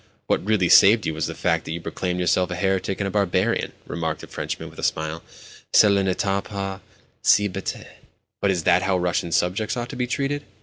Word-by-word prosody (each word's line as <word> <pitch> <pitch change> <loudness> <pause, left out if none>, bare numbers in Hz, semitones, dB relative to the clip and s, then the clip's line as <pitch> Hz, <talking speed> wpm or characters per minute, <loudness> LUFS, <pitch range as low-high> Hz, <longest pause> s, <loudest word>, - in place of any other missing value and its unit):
"What - - 0
really 100 -3 +2
saved 105 +5 +6
you 80 - -1
was 80 - -2
the - - -6
fact 80 -2 0
that - - -4
you 85 - -4
proclaimed 90 +1 -3
yourself 90 0 +2
a 90 - -3
heretic 95 +1 -1
and 100 - -1
a - - -4
barbarian," 100 +2 0
remarked 80 -2 -3
the - - -10
Frenchman - - -5
with - - -13
a - - -7
smile. 80 +1 -1 0.5
"Cela 100 -2 +6
n'était 95 +1 0
pas 100 -2 -5 0.4
si 105 0 +4
bête." 90 - -5 0.6
"But 100 - +2
is 90 -4 0
that 90 +3 +4
how 95 0 +1
Russian 90 -1 -1
subjects 100 +8 0
ought 120 0 -4
to - - -7
be 125 0 -2
treated? 140 +3 -1
95 Hz, 210 wpm, -23 LUFS, 90-105 Hz, 0.6 s, saved